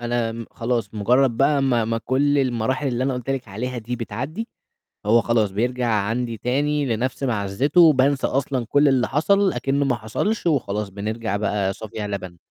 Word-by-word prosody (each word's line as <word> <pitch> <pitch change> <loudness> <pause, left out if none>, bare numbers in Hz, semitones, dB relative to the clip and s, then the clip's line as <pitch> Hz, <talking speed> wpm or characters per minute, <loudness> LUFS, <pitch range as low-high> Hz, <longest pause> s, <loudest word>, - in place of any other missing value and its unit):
أنا 115 -1 -2
خلاص 115 -3 -2
مجرّد 120 +4 +2
بقى 140 +2 +3
ما 120 -4 +2
ما 115 +1 -1
كُلّ 140 +4 +1
المراحل 130 +2 0
اللي 125 +1 -1
أنا 135 -1 0
قُلت 125 +1 -4
لِك 130 -5 -3
عليها 120 +5 -4
دي 120 +2 -4
بتعدّي، 140 - -5 0.6
هو 115 +2 +5
خلاص 110 -4 +1
بيرجع 125 +4 -1
عَندي 115 +2 -1
تاني 145 +5 0
لنَفْس 125 +3 -2
مَعزّته 125 - +2
وبانسى 140 -3 +4
أصلًا 130 -2 -1
كُلّ 145 +5 +3
اللي 130 -3 +3
حصل، 195 +7 +2
أكنّ 135 +3 0
ما 130 -3 +1
حصلش، 175 - -2
وخلاص 105 -9 0
بنرجع 105 +1 -3
بقى 100 -2 -1
صافي 110 +2 -10
يا 105 -1 -3
لَبَن. 95 -3 -6
120 Hz, 175 wpm, -22 LUFS, 110-135 Hz, 0.6 s, هو